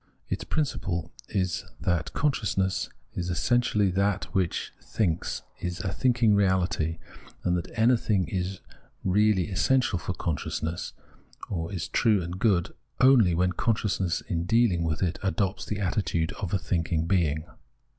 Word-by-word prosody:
Its - - -2
principle 90 - -2 0.2
is 95 -4 -1 0.2
that 90 -2 0
con 145 0 +2
sciousness 95 -6 -1 0.2
is 90 0 -3
essentially 105 +1 +2
that 100 +1 +1
which 95 -4 -1
thinks, 90 -7 -1 0.2
is 90 0 -3
a 95 - -2
thinking 120 -4 +3
reahty, 95 -5 +1 0.5
and 90 - +2
that 85 - -3
anything 110 -5 +3
is 90 +1 -3 0.4
really 100 0 +3
essential 110 +1 +2
for 95 - -4
con 80 -5 -1
sciousness, 80 +4 -4 0.6
or 85 -2 -2
is 90 -4 -3
true 110 -3 +3
and 85 +2 -5
good, 95 -4 +2 0.3
only 125 -10 +6
when 90 +1 +2
consciousness 95 -2 0
in 85 -1 -2
dealing 115 -4 +3
with 80 +1 -1
it 90 0 -1
adopts 95 0 -1
the 105 - -3
attitude 90 -4 0
of 95 -5 -3
a 100 - +2
thinking 85 -2 -1
being. 80 -4 +1
95 Hz, 145 wpm, -27 LUFS, 85-105 Hz, 0.6 s, only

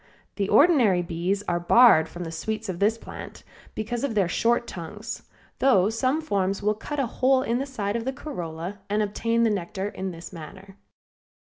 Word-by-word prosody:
The 200 -1 -1
ordinary 225 - +5
bees 175 +4 -2
are 175 -3 -1
barred 175 -3 +6
from 175 +2 -7
the 165 - -6
sweets 215 +6 -4
of 175 -2 -4
this 215 +3 +2
plant - - -10 0.3
because 230 +3 -3
of 265 -6 -1
their 195 -4 +3
short 235 +6 +1
tongues, 210 +6 -7 0.3
though 215 -7 +4
some 255 +7 0
forms 200 -6 -1
will 210 +1 +3
cut 290 +7 -5
a 275 - +2
hole 260 +3 +2
in 235 0 0
the 275 - -3
side 210 -6 -3
of 230 0 -2
the 265 - 0
corolla 180 - -6
and 210 +1 +1
obtain 230 +3 0
the 225 - +3
nectar 190 +1 -3
in 190 -1 -5
this 170 +1 -9
manner. 190 +4 -11
205 Hz, 190 wpm, -25 LUFS, 185-235 Hz, 0.3 s, barred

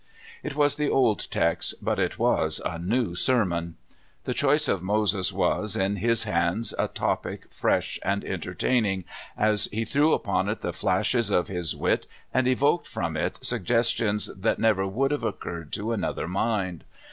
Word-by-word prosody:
It 150 -2 -5
was 145 -1 +2
the 150 -1 +1
old 120 -6 +2
text, 85 0 +1
but - - -1
it - - 0
was - - +1
a 80 - -2
new 100 +2 0
sermon. 85 -6 0 0.5
The - - -2
choice - - +2
of 95 - +1
Moses 100 -1 +1
was, 105 -2 0
in 100 +2 0
his 115 +3 +2
hands, 90 +2 0
a - - +2
topic - - -2
fresh - - 0
and 100 +1 0
entertaining, 105 -7 0 0.3
as 105 -1 +2
he 110 +2 -3
threw 145 +7 +3
upon 95 0 0
it 105 - -3
the - - -2
flashes 120 -4 +1
of 90 -3 +1
his 90 -4 -2
wit, - - 0 0.3
and 130 -1 +2
evoked 140 +6 +2
from 85 -2 -3
it 80 - -1
suggestions 115 -2 +1
that 100 +4 0
never 105 -4 +2
would 135 +8 0
have 145 -5 -1
occurred 85 -7 -4
to 105 +2 -2
another 105 -7 -2
mind. 95 -2 -1
105 Hz, 165 wpm, -26 LUFS, 95-120 Hz, 0.5 s, threw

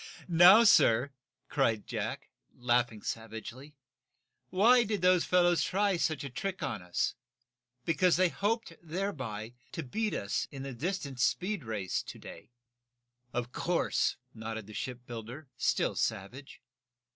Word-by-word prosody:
"Now, 180 +6 +8
sir," 130 - +5 0.4
cried 115 -7 +1
Jack, - - -4 0.2
laughing 120 -3 0
savagely, 115 +6 -7 0.7
"why 235 +7 +5
did 210 -4 -3
those 180 -1 +4
fellows 175 -4 +3
try 200 0 +1
such 155 -3 -1
a 140 - -5
trick 190 +8 -4
on 110 -7 -3
us? 90 0 -1 0.7
Because 170 +2 +3
they 185 -1 +4
hoped, 215 0 -1
thereby, 135 - -4 0.2
to 165 - -4
beat 215 - -2
us 100 - -2
in 135 -1 -8
the 135 -1 -5
distance 140 -2 -3
speed 190 -3 0
race 105 -5 -2
to - - -10
day." 80 - -11 0.8
"Of 120 0 -3
course," 175 +5 0 0.2
nodded 110 -1 -6
the 110 - -12
shipbuilder, 125 +3 -7
still - - +1
savage. 125 +9 -4
140 Hz, 130 wpm, -31 LUFS, 115-185 Hz, 0.8 s, Now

